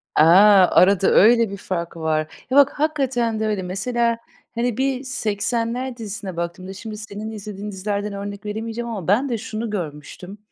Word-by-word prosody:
A! -, -, +6 dB, 0.6 s
Arada 195 Hz, +1 st, +4 dB
öyle 230 Hz, +1 st, +5 dB
bir 200 Hz, -, -6 dB
fark 170 Hz, -3 st, -4 dB
var. 160 Hz, -1 st, 0 dB, 0.3 s
Ya 265 Hz, -, +3 dB
bak, 285 Hz, -1 st, +7 dB
hakikaten 265 Hz, -7 st, 0 dB
de 220 Hz, -, 0 dB
öyle. 210 Hz, -3 st, -1 dB
Mesela, 230 Hz, +6 st, -1 dB, 0.4 s
hani, 235 Hz, -1 st, -1 dB
bir 265 Hz, 0 st, 0 dB
Seksenler 240 Hz, +1 st, -2 dB
dizisine 205 Hz, -5 st, -6 dB
baktığımda 170 Hz, +2 st, -5 dB
şimdi 215 Hz, +2 st, -8 dB
senin 210 Hz, 0 st, -7 dB
izlediğin 210 Hz, -1 st, -7 dB
dizilerden 200 Hz, +1 st, -3 dB
örnek 200 Hz, +1 st, -7 dB
veremeyeceğim 225 Hz, +3 st, -4 dB
ama 200 Hz, -8 st, -5 dB
ben 235 Hz, +9 st, +2 dB
de 235 Hz, -, -1 dB
şunu 220 Hz, +1 st, -5 dB
görmüştüm. 180 Hz, +1 st, -6 dB
215 Hz, 160 wpm, -22 LUFS, 195-235 Hz, 0.6 s, bak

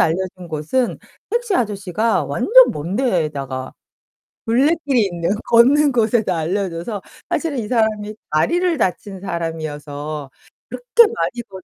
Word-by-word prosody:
알려준 180 Hz, +1 st, -1 dB
곳은 160 Hz, +12 st, -1 dB, 0.3 s
택시 470 Hz, -2 st, 0 dB
아저씨가 210 Hz, -, 0 dB
완전 430 Hz, -, +5 dB
먼 165 Hz, +6 st, -4 dB
데에다가 150 Hz, -, -2 dB, 0.7 s
둘레길이 270 Hz, 0 st, +2 dB
있는 170 Hz, 0 st, -2 dB, 0.2 s
걷는 275 Hz, +5 st, +5 dB
곳에다 220 Hz, -5 st, +1 dB
알려줘서 180 Hz, +4 st, -2 dB, 0.3 s
사실은 315 Hz, -6 st, -1 dB
이 225 Hz, -, -3 dB
사람이 215 Hz, -2 st, 0 dB, 0.2 s
다리를 340 Hz, -, +1 dB
다친 190 Hz, -1 st, -2 dB
사람이어서 155 Hz, -4 st, -5 dB, 0.4 s
그렇게 470 Hz, -2 st, +3 dB
많이 240 Hz, -, -2 dB
걷 190 Hz, -2 st, -10 dB
205 Hz, 290 characters per minute, -20 LUFS, 165-250 Hz, 0.7 s, 완전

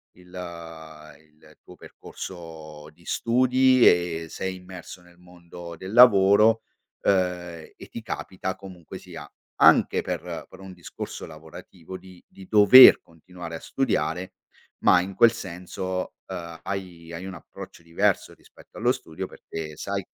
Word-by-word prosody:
il 90 Hz, 0 st, -19 dB
il 80 Hz, -3 st, -12 dB
tuo -, -, -15 dB
percorso 80 Hz, -4 st, -11 dB
di 85 Hz, +2 st, -24 dB
studi 130 Hz, +1 st, +3 dB
e 85 Hz, -2 st, +2 dB
sei 95 Hz, 0 st, -5 dB
immerso 90 Hz, -1 st, -11 dB
nel 90 Hz, 0 st, -21 dB
mondo 85 Hz, -1 st, -12 dB
del 95 Hz, +4 st, -9 dB
lavoro, 110 Hz, -1 st, +6 dB, 0.4 s
uhm, -, -, +3 dB, 0.6 s
e -, -, -13 dB
ti 115 Hz, -, -7 dB
capita 95 Hz, -3 st, -5 dB
comunque 90 Hz, -4 st, -11 dB
sia, -, -, -11 dB, 0.3 s
anche -, -, +5 dB
per -, -, -5 dB
per -, -, -15 dB
un 95 Hz, -1 st, -10 dB
discorso 85 Hz, -1 st, -8 dB
lavorativo, 80 Hz, +3 st, -12 dB
di 95 Hz, -1 st, -16 dB
di 95 Hz, -1 st, -15 dB
dover 110 Hz, +6 st, +9 dB
continuare 85 Hz, +1 st, -11 dB
a 80 Hz, -, -7 dB
studiare, 95 Hz, -, -2 dB, 0.5 s
ma 90 Hz, -, +5 dB
in 95 Hz, +1 st, -7 dB
quel 115 Hz, +2 st, +5 dB
senso, 95 Hz, -2 st, -6 dB, 0.2 s
uhm, 85 Hz, -1 st, -7 dB
hai 90 Hz, -4 st, -7 dB
hai 85 Hz, +2 st, -7 dB
un 95 Hz, -, -7 dB
approccio 85 Hz, 0 st, -12 dB
diverso, 85 Hz, 0 st, 0 dB
rispetto -, -, -19 dB
allo 120 Hz, +3 st, +2 dB
studio 80 Hz, -11 st, -7 dB
perché 80 Hz, -2 st, -8 dB
sai -, -, -4 dB
90 Hz, 135 wpm, -24 LUFS, 85-95 Hz, 0.6 s, dover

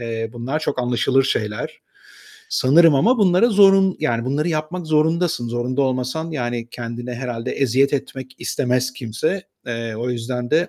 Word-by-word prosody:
eee, 115 Hz, -1 st, -4 dB
bunlar 130 Hz, +6 st, -3 dB
çok 130 Hz, -, -2 dB
anlaşılır 125 Hz, +2 st, +2 dB
şeyler. 105 Hz, -5 st, -3 dB, 0.7 s
Sanırım 155 Hz, +4 st, +5 dB
ama 230 Hz, -, +3 dB
bunlara 195 Hz, +3 st, +4 dB
zorun 195 Hz, -2 st, +5 dB
yani 115 Hz, 0 st, 0 dB
bunları 145 Hz, +5 st, -1 dB
yapmak 160 Hz, +2 st, -3 dB
zorundasın. 160 Hz, -4 st, +1 dB
Zorunda 120 Hz, +3 st, -1 dB
olmasan 130 Hz, +5 st, -2 dB
yani 120 Hz, -4 st, -3 dB
kendine 120 Hz, +1 st, -6 dB
herhâlde 125 Hz, 0 st, -4 dB
eziyet 135 Hz, +1 st, +2 dB
etmek 130 Hz, -1 st, -5 dB
istemez 125 Hz, -1 st, -1 dB
kimse. 130 Hz, -, -3 dB, 0.2 s
Eee, 115 Hz, -2 st, -4 dB
o 120 Hz, +3 st, -2 dB
yüzden 120 Hz, +1 st, -4 dB
de 165 Hz, +3 st, +2 dB
130 Hz, 145 wpm, -21 LUFS, 120-160 Hz, 0.7 s, Sanırım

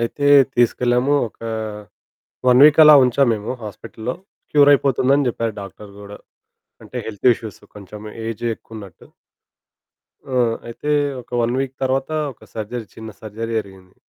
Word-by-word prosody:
అయితే 130 Hz, +5 st, -2 dB, 0.3 s
తీసుకెళ్ళాము 125 Hz, +3 st, +2 dB
ఒక -, -, -31 dB, 1.1 s
1 125 Hz, +2 st, +6 dB
వీక్ 150 Hz, +1 st, +6 dB
అలా 150 Hz, -, +9 dB
ఉంచాం 125 Hz, +1 st, +2 dB
మేము 105 Hz, +3 st, -5 dB
హాస్పిటల్లో 110 Hz, +3 st, -7 dB, 0.4 s
క్యూర్ 145 Hz, -1 st, +6 dB
అయిపోతుందని 140 Hz, 0 st, +2 dB
చెప్పారు 115 Hz, -2 st, -3 dB
డాక్టరు 100 Hz, +1 st, -11 dB
కూడా 100 Hz, 0 st, -11 dB, 0.7 s
అంటే -, -, -10 dB
హెల్త్ 110 Hz, +3 st, 0 dB
ఇష్యూస్ 110 Hz, -4 st, -10 dB, 0.2 s
కొంచెం 105 Hz, +1 st, -11 dB, 0.3 s
ఏజ్ 115 Hz, 0 st, -5 dB
ఎక్కువ 115 Hz, -, -17 dB
ఉన్నట్టు. 100 Hz, -5 st, -12 dB, 1.2 s
ఆ! 130 Hz, -, -3 dB, 0.3 s
అయితే 120 Hz, +5 st, -5 dB, 0.3 s
ఒక -, -, -30 dB
1 120 Hz, +1 st, 0 dB
వీక్ 135 Hz, -1 st, -4 dB
తర్వాత 135 Hz, +2 st, -1 dB, 0.2 s
ఒక 115 Hz, -, -19 dB
సర్జరీ 110 Hz, +1 st, -5 dB
చిన్న 110 Hz, 0 st, -9 dB
సర్జరీ 110 Hz, +2 st, -6 dB
జరిగింది. 95 Hz, -3 st, -10 dB
115 Hz, 135 wpm, -20 LUFS, 105-130 Hz, 1.2 s, అలా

